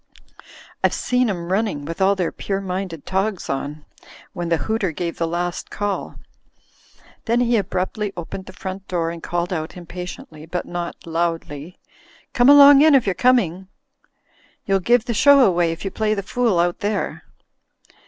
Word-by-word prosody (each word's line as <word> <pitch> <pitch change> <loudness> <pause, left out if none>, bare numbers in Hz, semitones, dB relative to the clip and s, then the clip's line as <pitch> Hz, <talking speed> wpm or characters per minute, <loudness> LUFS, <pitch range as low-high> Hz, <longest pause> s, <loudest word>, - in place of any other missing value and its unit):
I've - - +3
seen 250 -1 +1
'em 175 -3 -4
running, 195 -9 -1
with 165 +4 -6
all 195 +1 +4
their 180 -3 -1
pure 195 -1 -3
minded 185 -4 -5
togs 190 -2 -1
on, 145 +2 -5 0.5
when 175 -3 -4
the 165 - +2
hooter 220 -5 0
gave 170 +1 -4
the 165 - 0
last 175 +1 -3
cdl." 205 -2 -3 1.1
Then 235 +1 +2
he 240 -1 +2
abruptly 200 +1 -2
opened 185 +3 -7
the - - -8
front 190 +1 -7
door 165 -2 -1
and 170 -1 -8
called 175 +2 -2
out 160 +1 -4
impatiently, 175 -3 -9
but 180 +1 -3
not 175 -1 -6
loudly: 165 -1 -3 0.6
"Come 245 +2 +4
along 285 -1 +9
in 310 -1 +6
if 265 - +4
you're 195 - +1
coming. 190 -7 +2 1.0
You'll 195 -1 +2
give 240 +5 +2
the 240 - -2
show 280 +5 +6
away 175 -2 +2
if 165 +4 -7
you 195 - -2
play 215 -1 0
the 200 - -3
fool 235 -2 0
out 175 0 +1
there." 205 0 -2
185 Hz, 165 wpm, -21 LUFS, 170-215 Hz, 1.1 s, along